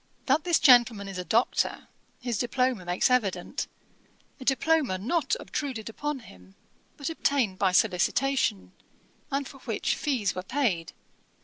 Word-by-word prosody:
That 290 +5 +2
this 345 -2 +4
gentleman 240 -6 +5
is 195 -2 -6
a - - -3
Doctor, 230 +6 0 0.3
his 240 -4 -3
diploma 250 -4 0
makes 180 +8 +1
evident; 215 +2 0 0.7
a - - -8
diploma 270 -5 +2
not 315 - 0
obtruded 255 - -4
upon 295 +4 -4
him, 95 - -16 0.4
but 285 +2 -3
obtained 260 -11 0
by 190 -2 +3
solicitation, 195 - +1 0.6
and 275 0 -2
for 275 - -13
which - - -1
fees 255 -9 -1
were 185 - -4
paid. 195 - -1
245 Hz, 135 wpm, -27 LUFS, 190-275 Hz, 0.7 s, gentleman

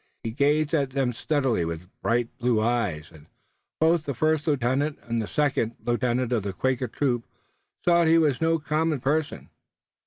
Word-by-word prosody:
He 115 - -3
gazed 145 +4 +1
at 140 -4 +2
them 130 -2 -1
steadily 130 - 0
with 85 +2 -5
bright 115 0 0
blue 120 -2 +2
eyes, 110 -9 -1
and 75 -1 -16 0.5
both 160 0 +3
the 140 - -3
first 155 +3 +1
lieutenant 140 +1 0
and 115 -1 -2
the 105 - -4
second 135 -6 0
lieutenant 120 +1 0
of 120 -3 +1
the 100 -1 -4
Quaker 130 +6 -1
troop 120 0 -1 0.6
saw 170 -1 +5
that 170 - +3
he 165 - +6
was 150 -5 +2
no 165 0 +3
common 155 -1 0
person. 145 +4 -2
130 Hz, 175 wpm, -25 LUFS, 115-150 Hz, 0.6 s, he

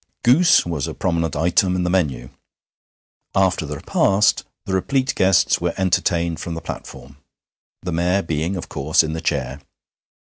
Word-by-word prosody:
Goose 150 +9 +5
was 80 -6 -3
a - - -6
prominent 85 -3 -1
item 90 +4 +2
in 90 - -1
the 90 - -1
menu. 65 -9 -1 1.0
After 95 -4 +1
the 75 - -5
repast 100 +7 +2 0.2
the 95 - -4
replete 130 +8 0
guests 95 -1 +2
were - - -1
entertained 85 -2 0
from 85 - -5
the - - -4
platform, 70 +2 -9 0.7
the 90 - -4
Mayor 90 +4 +1
being, 80 +3 -2
of 90 - -6
course, 75 +4 +1
in 80 0 -4
the 80 - -4
chair. 70 -2 -2
85 Hz, 155 wpm, -20 LUFS, 80-95 Hz, 1.0 s, Goose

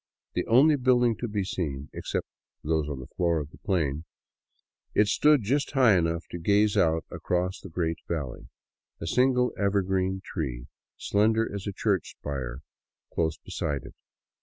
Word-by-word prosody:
The - - -1
only 145 +6 +6
building 125 -3 +3
to 120 - -3
be 105 -2 -1
seen, 75 -7 -3
except - - -3 0.4
those 80 -1 0
on 70 -3 -4
the 65 - -7
floor 85 +2 0
of 75 0 -6
the - - -16
plain, 80 -6 -1 0.9
it 105 - +5
stood 150 +2 +4
just 140 +8 0
high 125 -7 +6
enough 85 -1 0
to 85 - -5
gaze 100 +4 +3
out 80 -1 +2
across 90 +1 -1
the 95 - -10
great 80 0 -2
valley, 75 -7 -4 0.5
a - - -5
single 125 +6 +2
evergreen 95 -1 +1
tree, 65 -8 -4 0.3
slender 110 +2 +2
as 100 0 -5
a - - -1
church 100 -3 -1
spire, 65 -3 -5 0.5
close 80 -1 0
beside 70 -2 -3
it. - - -11
95 Hz, 160 wpm, -27 LUFS, 80-110 Hz, 0.9 s, only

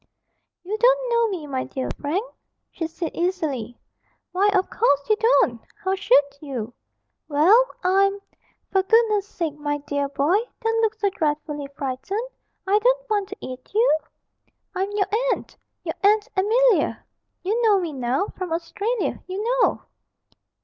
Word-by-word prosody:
'You 420 +4 -3
don't - - +4
know 470 0 +3
me, 365 -7 -4
my 265 -3 -2
dear 260 - -4
Frank,' 335 +10 -1 0.5
she 330 - -3
said 330 0 -5
easily; 310 - -2 0.5
'why 385 +3 +3
of 380 -2 +2
course 285 - +1
you 430 - +4
don't; 425 - +3 0.2
how 380 0 +1
should 285 -7 +4 0.2
you? 250 -6 -5 0.5
Well, 340 +12 +5 0.2
I'm 395 +2 +3 0.5
(for 385 - +3
goodness 425 0 +3
sake, 330 -6 -3
my 290 0 -1
dear 285 -1 -2
boy, 295 +8 +2 0.2
don't 455 -1 +1
look 445 -1 +1
so 410 -3 0
dreadfully 295 -3 -2
frightened, 290 - -3 0.4
I 400 +2 +3
don't - - +1
want 410 -2 0
to - - -7
eat 255 +8 -9
you!) 445 -7 +4 0.8
I'm 385 +1 -1
your 405 -2 +2 0.3
aunt - - -8 0.3
your - - -3
Aunt 420 +1 +4
Amelia, 450 +4 +2 0.4
you 430 +6 0
know 425 -4 +4
me 340 -4 -3
now 260 +6 0
from 370 -3 -6
Australia, 400 +8 -2
you 380 +3 -3 0.2
know!' - - +2
380 Hz, 150 wpm, -23 LUFS, 295-430 Hz, 0.8 s, Well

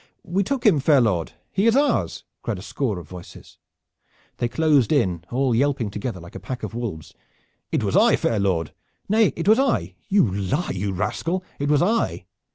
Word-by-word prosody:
"We 190 +4 0
took 260 +5 -3
him, 185 -9 +5
fair 140 +1 +4
lord. 90 -11 0 0.2
He 200 +4 +1
is 230 - +4
ours!" 270 - +1 0.2
cried - - -3
a 95 - -9
score 115 -4 -2
of 85 -4 -9
voices. 90 +1 -12 0.8
They 120 - 0
closed 145 -3 +2
in, 85 -3 +1
all 130 0 +1
yelping 125 -3 +1
together 105 -1 -4
like 85 0 -12
a - - -7
pack 120 +6 -6
of 110 - -5
wolves. 110 -10 -5 0.6
"It - - 0
was - - -1
I, - - +5
fair 110 - 0
lord!" 90 -5 0 0.3
"Nay, 215 0 +3
it 165 - -4
was 220 +4 +6
I!" 95 - +1
"You 200 -5 +4
lie, 100 - -1
you 100 +1 -2
rascal, 155 - -2 0.2
it 145 +1 -1
was 150 +2 +4
I!" 225 +5 0
120 Hz, 190 wpm, -23 LUFS, -, 0.8 s, was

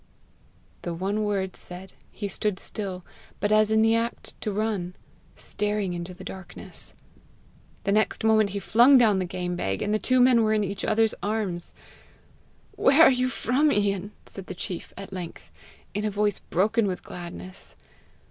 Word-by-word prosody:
The 170 -1 -4
one 200 +5 -1
word 195 -2 -1
said, 180 +1 -9 0.2
he 205 - -5
stood 200 0 -1
still, 190 -3 -4 0.3
but 205 - 0
as 215 0 +5
in 220 0 +4
the 225 0 +4
act 230 +1 -3
to 215 - -2
run, 200 -4 -2 0.4
staring 210 -3 -2
into 175 +1 -6
the 185 - -11
darkness. 190 -1 -6 0.9
The 200 - 0
next 215 +1 +1
moment 220 -2 +4
he 200 +1 -3
flung 240 +7 +6
down 215 -6 +4
the 185 - 0
game 180 0 -3
bag, 95 - -2
and 210 +1 0
two 255 0 +3
men 250 -2 +6
were 220 -1 +2
in 215 -1 +2
each 200 0 -4
other's 220 0 +2
arms. 205 -5 -2 1.0
"Where 285 +4 +5
are - - +8
you 255 0 +1
from, 270 +4 +2
Ian?" 205 -1 0
said 195 -2 -10
the 185 - -6
chief 180 -1 -5
at 195 0 -8
length, 175 -3 -7 0.4
in 205 +2 -2
a 215 - +1
voice 205 -1 0
broken 210 +4 +1
with 185 -2 -3
gladness. 180 +2 -9
205 Hz, 165 wpm, -26 LUFS, 185-220 Hz, 1.0 s, are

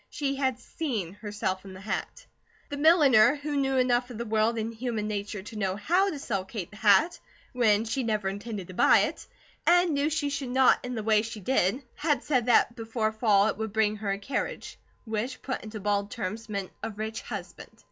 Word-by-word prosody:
She 275 -2 -2
had 260 -3 0
SEEN 235 - -4
herself 205 -2 -3
in 195 -1 -10
the 185 - -10
hat. 210 - -4 0.4
The 285 - -4
milliner, 290 -6 +6
who 290 0 -4
knew 270 -1 +1
enough 250 -1 +2
of 245 - -8
the 235 - -4
world 220 +1 +1
and 225 +1 -3
human 225 -2 -3
nature 205 -1 -4
to 215 - -10
know 190 -3 -1
how 355 - +2
to 320 - -4
sell 200 -8 -2
Kate 190 -2 -6
the 210 - -12
hat, 215 - +4 0.3
when 225 -3 +3
she 250 +4 -1
never 215 -4 -1
intended 200 -1 -5
to - - -8
buy - - +5
it, - - -3 0.4
and 350 0 +5
knew 285 +2 +1
she 290 -2 -1
should 275 -2 -3
not 260 +1 +4
in 250 0 -4
the 220 - -3
way 215 -1 +4
she 225 0 -6
did, 215 +3 +1
had 295 -5 0
said 255 -5 +1
that 240 0 +4
before 225 -1 -2
fall 215 -3 +3
it 220 - -1
would 220 -2 -4
bring 215 -1 +2
her 205 -1 -4
a 195 - -1
carriage, 205 +7 -4 0.3
which 225 +3 -3
put 260 - -3
into 215 0 -7
bald 205 0 0
terms 220 +1 -5
meant 200 -3 -4
a - - -3
rich 220 +1 -5
husband. - - -8
225 Hz, 210 wpm, -28 LUFS, 210-265 Hz, 0.4 s, milliner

